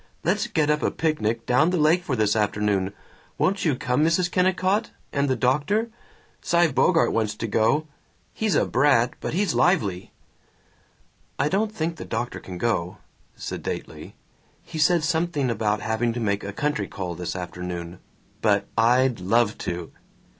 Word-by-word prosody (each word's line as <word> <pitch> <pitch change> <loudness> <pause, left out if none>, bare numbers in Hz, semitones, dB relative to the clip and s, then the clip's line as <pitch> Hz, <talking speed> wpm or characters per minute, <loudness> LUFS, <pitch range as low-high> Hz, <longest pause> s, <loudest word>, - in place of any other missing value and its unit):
Let's 205 +7 +1
get 155 -9 +1
up 150 - 0
a - - +2
picnic 115 -8 -1
down 135 +7 +3
the 180 - 0
lake 160 +3 +3
for 140 - -1
this 110 -2 +2
afternoon. 105 -2 0 0.5
Won't 195 0 +1
you 150 -5 +2
come, 130 +1 0
Mrs. 175 +2 +2
Kennicott, 185 +3 +1 0.2
and 140 0 +1
the 130 - +2
doctor? 150 - +1 0.5
Cy 170 -2 +3
Bogart 165 +6 +3
wants 110 -2 0
to 115 - -4
go 115 +8 +2 0.5
he's 215 -6 0
a - - +3
brat 130 -3 +3
but - - -4
he's 200 +2 +1
lively." 100 - +1 1.3
"I 140 +3 +1
don't 210 +4 0
think 165 -5 -3
the - - -7
doctor 120 - -3
can 90 -1 -8
go," 95 -3 -1 0.4
sedately. - - -6 0.5
"He 160 - -7
said 165 +1 +3
something 160 -5 0
about 105 -2 0
having 115 +1 0
to 120 - -4
make 100 -3 -1
a 100 - -4
country 150 +8 -1
call 90 -3 -5
this 90 +1 -5
afternoon. 90 -1 -6 0.4
But 100 -2 +2
I'd 120 +1 +3
love 105 +4 +2
to." 85 -1 -4
130 Hz, 160 wpm, -24 LUFS, 105-165 Hz, 1.3 s, down